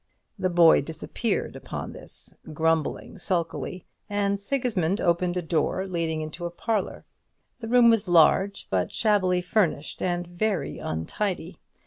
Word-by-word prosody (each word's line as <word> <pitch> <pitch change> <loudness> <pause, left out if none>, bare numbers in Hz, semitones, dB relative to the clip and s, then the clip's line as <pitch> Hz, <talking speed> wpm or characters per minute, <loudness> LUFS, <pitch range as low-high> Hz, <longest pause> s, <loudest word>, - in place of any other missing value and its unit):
The 185 -1 +1
boy 170 -2 +6
disappeared 160 - -3
upon - - -6
this, - - -5 0.2
grumbling 160 +4 -1
sulkily; 175 0 -2 0.2
and 200 -1 0
Sigismund 205 -6 0
opened 175 +1 +1
a 180 - -1
door 170 +3 0
leading 165 -4 -2
into 155 +3 -5
a - - -5
parlour. 205 +3 -2 0.5
The 225 - -6
room 235 0 +6
was 220 -3 +2
large, 180 +4 +4
but 95 -2 0
shabbily 190 -5 +2
furnished 175 -5 0
and 175 -1 -1
very 175 -3 -2
untidy. 175 - -3
180 Hz, 130 wpm, -26 LUFS, 165-200 Hz, 0.5 s, boy